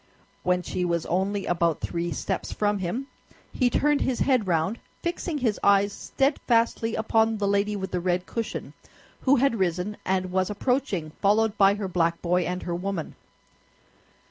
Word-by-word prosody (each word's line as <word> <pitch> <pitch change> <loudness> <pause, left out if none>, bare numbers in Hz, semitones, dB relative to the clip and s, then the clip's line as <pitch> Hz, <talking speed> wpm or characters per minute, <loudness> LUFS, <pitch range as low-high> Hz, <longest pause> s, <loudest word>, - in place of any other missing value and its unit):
When 180 0 +1
she 180 - -2
was 170 -2 0
only 195 +3 -1
about 170 -2 +1
three 170 0 -3
steps 140 - -3
from 205 -1 0
him, 190 +9 -3 0.5
he 250 -2 +2
turned 295 +4 +2
his 255 -2 0
head 255 -7 +2
round, 170 +6 0 0.2
fixing 340 -2 -2
his 235 -6 0
eyes 200 0 +4
steadfastly 235 -4 +1
upon 220 0 +2
the 205 -1 0
lady 200 +1 +1
with 190 -1 -4
the 180 - 0
red 180 0 0
cushion, 230 -1 -4 0.5
who 275 +1 +4
had 250 -4 +2
risen 185 +3 -1
and 185 -1 -1
was 185 +1 +1
approaching, 210 - -1
followed 215 +1 +3
by 200 -1 +5
her 205 -2 -3
black 170 -2 +1
boy 180 +1 +1
and 180 +1 -3
her 175 - -3
woman. 180 -1 -3
200 Hz, 165 wpm, -26 LUFS, 180-225 Hz, 0.5 s, by